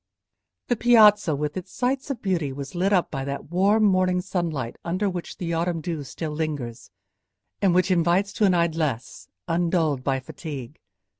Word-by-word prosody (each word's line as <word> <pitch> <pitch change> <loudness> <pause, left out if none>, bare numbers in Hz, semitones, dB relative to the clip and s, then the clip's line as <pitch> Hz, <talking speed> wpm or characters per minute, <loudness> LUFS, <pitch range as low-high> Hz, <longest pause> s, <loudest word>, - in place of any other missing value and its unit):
The 245 - +2
piazza 210 -8 +5
with 150 +1 -3
its 185 -2 -6
sights 260 +3 -1
of 255 -4 -4
beauty 170 -8 0
was 140 +1 -7
lit 185 +3 +1
up 185 -4 +2
by 135 -2 -3
that 140 +2 -6
warm 200 +5 +3
morning 185 -2 +3
sunlight 170 -9 -3
under 185 +4 -1
which 180 -3 -5
the 170 -2 -3
autumn 165 0 0
dew 160 -3 -4
still 155 +3 -5
lingers, 145 -7 -4 0.7
and 190 -3 +3
which 185 +1 +3
invites 180 +3 +2
to 215 - +2
an 185 -2 +4
idleness 160 -8 -1 0.2
undulled 165 -5 +1
by 135 -1 0
fatigue. 135 0 -8
170 Hz, 165 wpm, -24 LUFS, 150-190 Hz, 0.7 s, piazza